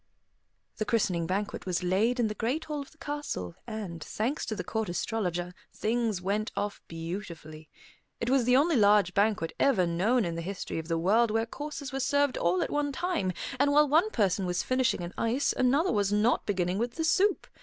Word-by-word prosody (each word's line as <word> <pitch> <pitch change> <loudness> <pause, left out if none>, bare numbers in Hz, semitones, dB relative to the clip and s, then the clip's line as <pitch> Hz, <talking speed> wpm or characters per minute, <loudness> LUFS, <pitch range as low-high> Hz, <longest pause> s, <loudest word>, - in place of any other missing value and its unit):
The 215 - -1
christening 185 -7 +1
banquet 200 +2 -3
was 180 -1 -1
laid 210 +8 +1
in 240 - +3
the 210 - -3
great 250 +9 -2
hall 300 -2 -3
of 280 - -10
the 315 - -23
castle, 290 - -4
and, 200 -8 -5
thanks 245 +8 -2
to 220 - -2
the 180 - -4
Court 220 +2 -2
Astrologer, 180 -2 -2 0.2
things 220 -4 -1
went 210 +3 -1
off 205 0 -2
beautifully. 165 -2 -7 0.5
It 230 - -2
was 260 -1 +3
the 250 +1 +5
only 315 +3 +3
large 205 -4 +4
banquet 200 -5 +1
ever 225 -10 +3
known 200 +8 +1
in 170 - -2
the 165 - -4
history 185 -1 -4
of 160 - -7
the 165 -1 0
world 215 +8 +3
where 225 +1 +1
courses 290 +2 -6
were 270 - -2
served 285 0 +2
all 175 +2 +1
at - - -4
one 290 -1 0
time, 280 - -1 0.3
and 285 +1 +4
while 295 +1 +5
one 320 +9 +3
person 195 - +1
was 180 0 -1
finishing 255 -7 +1
an 175 +2 -6
ice, 240 +5 +1
another 270 +7 +2
was 205 -2 +1
not 210 +4 +2
beginning 185 -1 0
with 240 +1 -2
the 325 - -2
soup. 390 +5 +2
215 Hz, 200 wpm, -29 LUFS, 180-265 Hz, 0.5 s, the